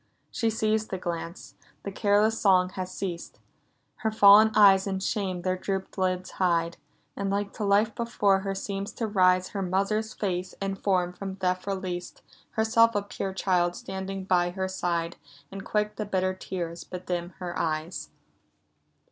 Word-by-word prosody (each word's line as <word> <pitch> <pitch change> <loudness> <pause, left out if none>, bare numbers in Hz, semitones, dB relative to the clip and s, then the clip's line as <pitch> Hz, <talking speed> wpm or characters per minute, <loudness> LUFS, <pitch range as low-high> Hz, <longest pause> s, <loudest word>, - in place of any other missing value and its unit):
— - - -44
She 230 - 0
sees 220 0 0
the 190 - -4
glance; 170 0 -5
— - - -32
the 200 - -4
careless 210 +3 +2
song 185 -2 +4
has 185 0 -5
ceased; 175 -3 -5 0.6
Her 225 -3 -1
fallen 215 0 +8
eyes 195 -2 +6
in 190 -1 -1
shame 190 -2 -2
their 185 0 +1
drooped 190 +1 -4
lids 185 -1 -1
hide: 170 -2 0 0.4
And 200 0 -2
like 200 0 -1
to 215 - -5
life 205 +2 +3
before 210 -4 +1
her 195 0 -3
seems 195 +1 -4
to 230 - -3
rise 185 -3 +3
Her 200 - -4
mother's 200 +4 -1
face 185 -2 -3
and 195 0 -3
form 180 -3 +1
from 195 +1 -6
death 185 0 -1
released, 185 -2 -4
— - - -31
Herself 230 +1 +3
a 205 - +1
pure 195 -1 -4
child 175 -2 +1
standing 190 0 -5
by 175 -2 +2
her 190 +1 -3
side, 170 -2 -2 0.2
— 145 0 -24
And 195 0 -7
quick 210 0 -1
the 215 - -2
bitter 185 -2 0
tears 175 -2 -5
bedim 180 -1 -5
her 180 -2 -5
eyes! 160 +2 -2
190 Hz, 175 wpm, -27 LUFS, 180-205 Hz, 0.6 s, fallen